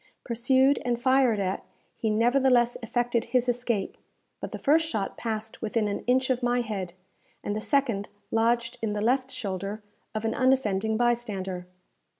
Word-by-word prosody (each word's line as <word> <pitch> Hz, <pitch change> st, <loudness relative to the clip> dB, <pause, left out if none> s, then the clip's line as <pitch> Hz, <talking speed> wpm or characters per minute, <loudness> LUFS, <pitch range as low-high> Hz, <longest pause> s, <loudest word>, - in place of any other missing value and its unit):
Pursued 260 Hz, +4 st, +3 dB
and 240 Hz, -1 st, 0 dB
fired 260 Hz, -3 st, +3 dB
at, 190 Hz, -1 st, -2 dB, 0.3 s
he 220 Hz, -, -1 dB
nevertheless 240 Hz, +2 st, +3 dB
effected 240 Hz, 0 st, 0 dB
his 250 Hz, +1 st, +1 dB
escape; 240 Hz, -4 st, -1 dB, 0.4 s
but -, -, -6 dB
the -, -, -4 dB
first 320 Hz, +3 st, +3 dB
shot 200 Hz, -9 st, -2 dB
passed 220 Hz, -1 st, -4 dB
within 220 Hz, -1 st, 0 dB
an 200 Hz, -, -2 dB
inch 260 Hz, +1 st, +3 dB
of 255 Hz, 0 st, 0 dB
my 245 Hz, 0 st, +2 dB
head, 195 Hz, -6 st, -4 dB, 0.5 s
and 205 Hz, -, -2 dB
the 215 Hz, -, -2 dB
second 240 Hz, -7 st, 0 dB, 0.2 s
lodged 230 Hz, +1 st, +1 dB
in 220 Hz, -2 st, -1 dB
the 210 Hz, -, -2 dB
left 255 Hz, +4 st, +1 dB
shoulder 200 Hz, -2 st, -4 dB, 0.3 s
of 215 Hz, +1 st, -2 dB
an 225 Hz, -, +1 dB
unoffending 220 Hz, -5 st, +2 dB
bystander. 205 Hz, -7 st, -1 dB
235 Hz, 155 wpm, -27 LUFS, 215-250 Hz, 0.5 s, Pursued